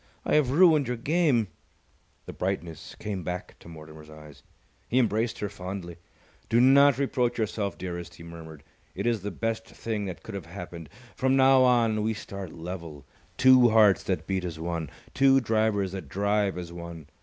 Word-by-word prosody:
I - - 0
have 150 -4 +3
ruined 155 -2 +5
your 125 0 -2
game!" 135 - +1 0.8
The - - -8
brightness 85 -4 -4
came 100 -4 -5
back 90 +2 -6
to - - -16
Mortimer's 80 -1 -12
eyes. 75 -2 -14 0.5
He 125 - +1
embraced 115 -2 +1
her 105 - -3
fondly. 95 -3 -7 0.5
"Do 115 - +3
not 135 +1 +6
reproach 125 -3 0
yourself, 105 -3 -2
dearest," 85 -2 -6
he 85 - -13
murmured. 80 -3 -11 0.3
"It - - -4
is 115 -3 +1
the 105 - -4
best 115 +3 -3
thing 110 -3 -4
that 90 -3 -7
could 110 - -9
have 95 -5 -6
happened. 85 -2 -9 0.3
From 130 0 +1
now 135 0 +5
on, 120 -4 +3
we 110 +1 -1
start 100 -4 -8
level, 85 -4 -8 0.3
two 130 -2 +6
hearts 110 -4 +5
that 90 -5 -2
beat 95 0 -2
as 85 -3 -5
one, 80 -2 -3 0.2
two 135 0 +5
drivers 110 -5 0
that 95 -1 -7
drive 100 -1 0
as 85 -1 -7
one. 85 -2 -9
100 Hz, 175 wpm, -27 LUFS, 85-120 Hz, 0.8 s, not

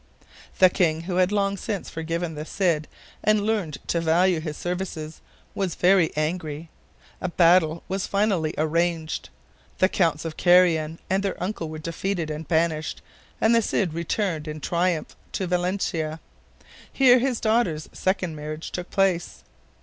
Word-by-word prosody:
The 185 -1 +6
king, 165 -4 +1
who 180 +1 -3
had 185 +1 +3
long 200 -1 +1
since 205 -1 -4
forgiven 165 +1 -3
the 150 0 -5
Cid 165 -3 0 0.4
and 210 0 +3
learned 205 -9 -1
to 170 - +1
value 170 +2 +3
his 155 -1 -5
services, 175 -3 -4 0.3
was 190 -4 -2
very 180 -2 +4
angry. 155 0 -3 0.5
A 185 - -1
battle 170 -2 +4
was 190 +1 -2
finally 195 -6 +1
arranged. 165 +1 -1 0.5
The 185 - +4
Counts 165 -5 0
of 160 -1 -5
Carrion 170 -3 +4
and 190 +1 +1
their 195 -1 -2
uncle 180 -3 -3
were 155 - -6
defeated 170 +1 -3
and 155 +1 -6
banished, 160 -1 0 0.4
and 225 - +4
the 230 - +5
Cid 195 -5 0
returned 170 -1 -2
in 155 0 -5
triumph 170 0 -1 0.2
to 190 - -1
Valencia. 175 -3 -1 0.7
Here 255 -2 +6
his 255 -1 0
daughters' 215 -9 +1
second 185 -3 -1
marriage 155 +1 -6
took 180 0 -5
place. 190 -3 0
175 Hz, 150 wpm, -25 LUFS, 160-190 Hz, 0.7 s, The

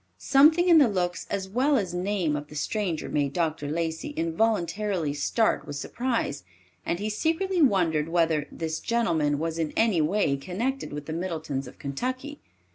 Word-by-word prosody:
Something 310 +6 +5
in 335 -2 +8
the 280 - +6
looks 180 -4 -2
as 195 -1 -2
well 260 +8 +2
as 185 -6 -2
name 180 -4 0
of 145 0 -5
the 150 - -12
stranger 175 +1 -2
made 140 -2 -1
Dr. 160 -3 -1
Lacey 160 +1 -3
involuntarily 175 -1 0
start 220 +9 +1
with 145 - -5
surprise, 230 - -2 0.4
and 170 - -1
he 205 +3 -3
secretly 330 - 0
wondered 170 - +3
whether; 165 -3 +1
this 160 -1 -3
gentleman 165 -11 +1
was 165 +2 -3
in 160 -2 -1
any 220 -8 +3
way 155 -3 +1
connected 230 - -3
with 145 0 -6
the 155 - -5
Middletons 160 -6 -3
of - - -12
Kentucky. 255 - -4
175 Hz, 165 wpm, -26 LUFS, 155-225 Hz, 0.4 s, in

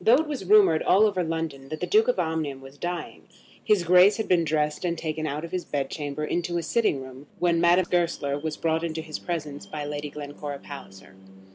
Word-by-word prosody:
Though 225 +5 +7
it 315 +4 +1
was 285 -10 -4
rumoured 190 -5 +5
all 200 +4 +5
over 195 -4 +1
London 160 -5 -4
that 155 - -5
the - - -1
Duke 435 +2 +4
of - - +2
Omnium 155 -4 -2
was 135 +1 -14
dying, 175 0 -5 0.4
his 210 -4 +3
Grace 180 +4 +6
had 220 - -2
been 175 -2 +3
dressed 150 0 0
and 170 -1 -1
taken 155 -1 -3
out 150 +3 -3
of 170 - -10
his 185 -1 -2
bed 140 -2 -3
chamber 150 0 -4
into 175 +2 -1
a 170 - -2
sitting 160 - +1
room, 130 +2 -12
when 170 -1 +2
Madame 175 +1 +4
Goesler 165 -5 0
was 155 0 -4
brought 160 0 0
into 160 -1 -3
his 155 -1 -6
presence 150 -5 -5
by 150 -1 -5
Lady 145 0 -4
Glencora 145 0 -7
Palliser. 95 -10 -11
160 Hz, 220 wpm, -26 LUFS, 145-175 Hz, 0.4 s, Though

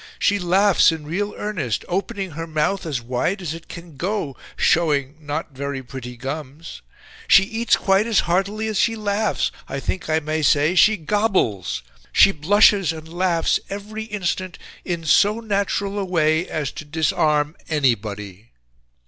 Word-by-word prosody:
She 205 -1 +2
laughs 190 +1 +4
in 160 -2 -6
real 205 +7 -3
earnest, 165 - -3
opening 195 +1 -3
her 165 +2 -6
mouth 160 +4 -1
as 135 -7 -3
wide 125 - -1
as 170 -5 -4
it 165 0 -10
can 170 -4 -11
go, 180 -5 -2 0.2
showing 145 -4 +2
not 155 +1 -4
very 140 0 -4
pretty 125 -1 -8
gums... 145 +4 -7 0.5
She 200 - +7
eats 225 +2 +1
quite 195 +3 +2
as 225 -3 +3
heartily 195 +5 -1
as 215 -3 -1
she 230 -1 +2
laughs, 210 -1 0 0.2
I 135 - -3
think 180 +4 -4
I 155 0 +3
may 155 +1 -2
say 150 +2 +3
she 210 +3 +5
gobbles... 160 - 0 0.3
She - - +6
blushes 195 +2 +4
and 160 -1 -9
laughs 175 -2 +1
every 210 +2 -6
instant 185 -4 -3 0.3
in 170 -3 -4
so 205 +8 +4
natural 200 -2 -1
a 195 - -1
way 160 -1 +1
as 150 -4 -2
to - - -8
disarm 150 0 +1
anybody." 105 - -1
165 Hz, 155 wpm, -22 LUFS, 145-200 Hz, 0.5 s, She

